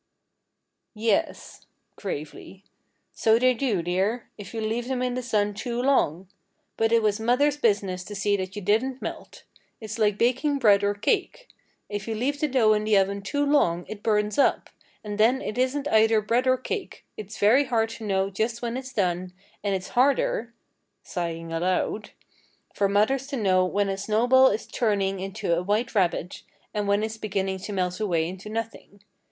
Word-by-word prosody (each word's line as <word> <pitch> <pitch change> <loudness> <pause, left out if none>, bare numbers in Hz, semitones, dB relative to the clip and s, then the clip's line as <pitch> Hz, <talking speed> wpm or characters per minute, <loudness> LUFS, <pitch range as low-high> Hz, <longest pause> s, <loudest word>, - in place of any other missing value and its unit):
"Yes," 215 -1 -2 0.3
gravely, 185 +2 -7 0.5
"so 220 0 +3
they 255 +1 +4
do, 230 -8 -1
dear, 195 +7 -1
if 205 - -10
you 230 - -5
leave 225 +2 -2
them 255 -1 -1
in 250 -1 -1
the 255 - -2
sun 210 -4 0
too 235 +3 -4
long. 195 - +1 0.5
But 225 0 +1
it 230 -1 +4
was 210 0 +1
mother's 250 +6 +2
business 200 -7 0
to 205 - -8
see 200 +1 +1
that 190 0 -5
you 205 - -6
didn't 245 +7 +1
melt. - - -8 0.4
It's 220 0 -7
like 210 -2 +2
baking 260 +5 +1
bread 205 -6 +4
or 205 0 +1
cake. 390 - -1 0.4
If 205 0 -5
you 225 - -2
leave 275 +6 -1
the 305 - +1
dough 245 -6 +4
in 210 0 0
the 215 -1 +3
oven 200 +1 +1
too 285 +9 -1
long 175 - +2
it 215 -1 -8
burns 210 0 0
up, - - +2 0.3
and 210 -1 -6
then 240 +5 +4
it 215 - -5
isn't 275 +3 0
either 220 -1 +4
bread 235 +4 0
or 255 0 +4
cake. 400 - -6
It's 215 0 -8
very 240 +8 +4
hard 225 -3 +1
to 225 - -9
know 195 -1 0
just 230 +4 -2
when 235 +1 -2
it's 260 0 -7
done, 180 -3 -1 0.3
and 200 -1 0
it's 185 -1 -5
harder" 245 -3 +1 0.5
sighing 165 -2 -4
aloud 185 +5 -1 0.6
"for 200 -1 +1
mothers 250 +7 +1
to 280 - -4
know 185 -4 +3
just - - -8
when 200 -1 +2
a 195 - -2
snowball 245 +6 +4
is 215 -2 -1
turning 195 -4 0
into 185 -3 -2
a 170 - -1
white 210 +6 -1
rabbit, 180 -3 0 0.3
and 210 -1 -2
when 200 +1 +2
it's 220 0 -4
beginning 195 -3 -2
to 205 +3 -7
melt 185 -2 -2
away 170 -7 0
into 190 +4 -8
nothing. 225 -2 -6
215 Hz, 185 wpm, -25 LUFS, 195-240 Hz, 0.6 s, they